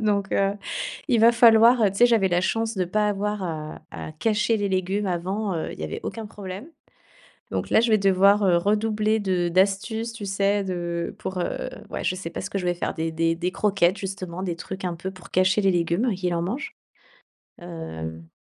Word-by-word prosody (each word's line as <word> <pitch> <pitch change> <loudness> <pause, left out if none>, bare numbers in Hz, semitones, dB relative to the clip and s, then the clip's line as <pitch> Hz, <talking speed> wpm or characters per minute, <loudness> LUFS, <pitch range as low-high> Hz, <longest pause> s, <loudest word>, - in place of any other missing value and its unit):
Donc, 205 -2 0
heu, 195 0 +2 0.6
il 245 -4 +3
va 230 +2 +6
falloir, 235 0 +6
heu, 205 - +4
tu 195 - -8
sais, 240 - +7
j'avais 225 -5 +3
la 175 -1 +2
chance 225 +3 -1
de 185 - +1
pas 210 +4 +1
avoir 205 0 -2
à 155 -3 -5
à 155 - -7
cacher 215 +6 +1
les 205 -1 -1
légumes 190 +2 -1
avant, 190 +3 -2
heu, 160 - -3
il - - -11
y - - -4
avait 80 - -4
aucun 225 -1 -5
problème. 200 - -8 0.8
Donc - - -3
là, - - +5
je 235 +1 +2
vais 215 - +5
devoir, 195 +1 +4
heu, 180 -3 +4
redoubler 215 +3 +1
de 185 -3 0
d'astuces, 200 +6 +1
tu 225 -3 -7
sais, 200 +1 +1
de 175 -2 -3
pour, 190 -3 -5
heu, 175 - -3 0.2
ouais, - - -4
je 185 - 0
sais 185 -2 -6
pas 165 - -6
ce - - -5
que - - -3
je 185 - -3
vais 175 - +2
faire. 175 - -3
Des 160 0 -3
des 165 +1 +1
des 180 +2 -2
croquettes, 195 -3 +2
justement, 185 -2 -5
des 175 -3 -3
trucs 190 +3 -7
un 180 -2 -2
peu, 180 +3 -5
pour 185 -2 -14
cacher 185 +3 +3
les 195 - +3
légumes 175 +7 +1
et - - -1
qu'il 180 -1 -1
en 170 - 0
mange. 235 - -4 0.9
Hem. 80 - -7
195 Hz, 220 wpm, -24 LUFS, 175-210 Hz, 0.9 s, sais